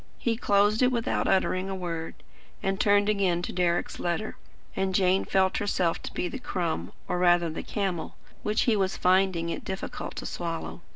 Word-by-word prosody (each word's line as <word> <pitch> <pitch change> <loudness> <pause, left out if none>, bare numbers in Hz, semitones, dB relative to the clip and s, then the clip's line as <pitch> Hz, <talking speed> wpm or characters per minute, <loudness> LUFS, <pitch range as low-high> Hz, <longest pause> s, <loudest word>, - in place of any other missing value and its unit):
He 230 -1 0
closed 205 0 +3
it 250 0 +4
without 235 -2 0
uttering 190 0 +1
a 195 - -2
word, 170 -3 -4 0.5
and 195 0 0
turned 205 -3 +4
again 190 -5 +1
to - - -4
Deryck's 175 -1 0
letter; 175 +5 -2 0.4
and 190 -1 0
Jane 190 0 +3
felt 190 -1 +2
herself 185 -5 0
to - - -7
be 180 - -1
the 260 - -6
crumb, 165 - -2 0.2
or 180 - -1
rather 175 -2 +4
the 155 - -4
camel, 190 -5 -3 0.3
which 210 +2 +1
he 230 - +3
was 190 -2 0
finding 185 -2 +2
it - - -4
difficult 190 0 -5
to - - -6
swallow. 170 0 -4
190 Hz, 180 wpm, -27 LUFS, 175-205 Hz, 0.5 s, it